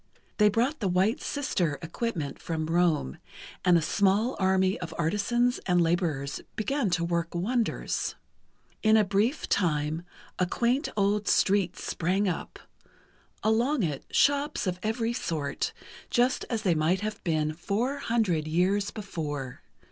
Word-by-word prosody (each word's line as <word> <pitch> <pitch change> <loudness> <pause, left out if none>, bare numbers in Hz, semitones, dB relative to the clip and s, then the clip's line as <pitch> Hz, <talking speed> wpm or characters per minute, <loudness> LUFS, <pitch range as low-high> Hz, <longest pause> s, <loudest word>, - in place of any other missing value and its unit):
They 210 0 +6
brought 245 +9 0
the 205 - 0
"White 190 - +2
Sister" 180 - -1
equipment 165 - -3
from 160 -2 -2
Rome, 165 - +1 0.4
and 180 -2 +5
a 165 - 0
small 205 +8 +2
army 190 0 +2
of 165 -2 -6
artisans 225 +9 +1
and 180 -1 +3
laborers 165 -5 0
began 245 +1 0
to 170 - -2
work 170 0 -2
wonders. 230 +6 -1 0.7
In 220 0 +5
a 215 - +5
brief 210 +8 0
time, 155 -3 0 0.4
a 180 - +2
quaint 245 - +1
old 205 +1 +1
street 195 -3 +2
sprang 190 +4 0
up—along 225 - -3
it 150 -5 -2
shops 285 -1 +2
of 180 -1 -2
every 225 +2 -1
sort, 160 - -2 0.4
just 250 +1 +2
as 225 -3 -2
they 185 -5 +3
might 165 +4 +1
have 215 0 -4
been 155 -3 0
four 225 - -2
hundred 215 - 0
years 185 +5 +1
before 150 - -5
190 Hz, 135 wpm, -28 LUFS, 165-225 Hz, 0.7 s, They